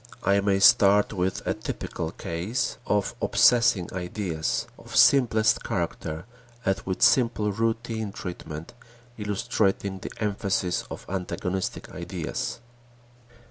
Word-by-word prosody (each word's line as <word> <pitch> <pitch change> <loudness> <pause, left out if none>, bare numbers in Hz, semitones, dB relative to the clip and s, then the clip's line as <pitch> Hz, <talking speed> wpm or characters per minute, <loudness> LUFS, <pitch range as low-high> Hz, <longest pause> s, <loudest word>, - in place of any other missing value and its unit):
I 100 0 +3
may 100 -1 +2
start 100 -1 +6
with 95 -1 -2
a - - +1
typical - - -5
case 90 +10 -3
of 105 -1 +1
obsessing 115 -7 +4
ideas 90 -3 -2
of - - -10
simplest 115 -5 +5
character 80 +3 -3 0.4
and 95 - +1
with 95 -1 -1
simple 115 -4 +4
routine 115 0 -2
treatment 85 -5 -7 0.5
illustrating 100 -1 0
the 100 - -6
emphasis 100 -4 -1
on - - -5
antagonistic 95 0 -3
ideas. - - -4
100 Hz, 105 wpm, -26 LUFS, 90-110 Hz, 0.5 s, start